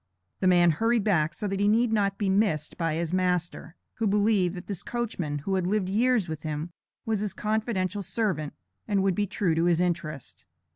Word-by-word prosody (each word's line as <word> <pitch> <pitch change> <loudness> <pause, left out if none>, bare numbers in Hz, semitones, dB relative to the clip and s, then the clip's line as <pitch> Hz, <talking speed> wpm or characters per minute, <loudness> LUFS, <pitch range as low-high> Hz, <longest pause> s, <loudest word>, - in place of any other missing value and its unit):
The 185 - +2
man 175 -2 +5
hurried 225 +7 +1
back, 160 -7 +1
so 210 - -3
that 195 0 -2
he 205 - +2
need 225 +2 +3
not 200 -2 +1
be 205 - -1
missed 190 -6 +1
by 165 -2 -1
his 170 +1 -2
master, 180 -2 -1 0.2
who 225 - 0
believed 200 -3 +2
that 180 - -8
this 200 -5 -5
coachman, 205 -11 -3
who 165 +7 -3
had 185 -2 0
lived 195 -1 0
years 225 0 +2
with 160 -2 -5
him, 155 +2 -4 0.3
was 220 -2 0
his 205 -2 -3
confidential 210 -3 -1
servant, 185 -7 -2 0.3
and 200 -3 +1
would 195 -1 +2
be 205 +3 0
true 195 -3 0
to 165 +1 +1
his 175 -1 +3
interest. 165 -6 -3
190 Hz, 200 wpm, -27 LUFS, 170-210 Hz, 0.3 s, man